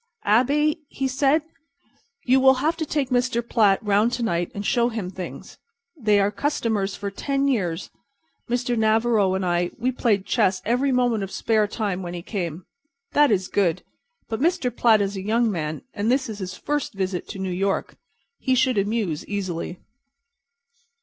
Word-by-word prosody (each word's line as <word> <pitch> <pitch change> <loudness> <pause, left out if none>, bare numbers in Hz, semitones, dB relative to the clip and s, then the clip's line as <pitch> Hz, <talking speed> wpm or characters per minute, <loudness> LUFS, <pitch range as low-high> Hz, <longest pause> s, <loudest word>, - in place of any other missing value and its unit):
"Abey," 285 +8 +3
he 270 - -2
said, 275 +4 +2 0.8
"you 260 +1 +4
will 265 0 +6
have 305 +6 0
to 315 -2 -3
take 280 -4 -1
Mr. 245 -1 +1
Platt 205 -5 +3
around 210 +2 +3
to 245 - -2
night 175 -5 -1
and 200 0 -4
show 240 +2 +2
him 215 -6 -4
things. 185 -1 -8 0.4
They 215 -8 +2
are 200 +1 +2
customers 220 -8 -1
for 200 -1 -5
ten 275 +6 -1
years. 180 -11 -1 0.6
Mr. 245 0 0
Navarro 220 -3 +2
and 190 -1 -1
I 175 0 +1
we 250 +2 0
played 215 -6 +1
chess 195 -6 +2
every 250 +5 +1
moment 245 -4 +2
of 195 - -5
spare 215 +1 +1
time 200 -3 -2
when 175 -1 -5
he 170 - -6
came. 175 -4 -4 0.5
That 295 0 +5
is 190 -4 +1
good, 185 -3 0 0.4
but 225 +2 -4
Mr. 315 -7 +1
Platt 225 -4 +4
is 200 0 -1
a 190 - -4
young 225 +3 +1
man 155 -4 -4
and 210 +3 0
this 265 -1 +1
is 215 -1 -6
his 185 -1 -5
first 295 -7 -2
visit 185 -2 -2
to - - -7
New 190 -1 -3
York. 195 +2 -1 0.4
He 260 -1 +1
should 255 -3 +2
amuse 200 -6 -1
easily." 185 -3 -4
220 Hz, 175 wpm, -24 LUFS, 195-250 Hz, 0.8 s, will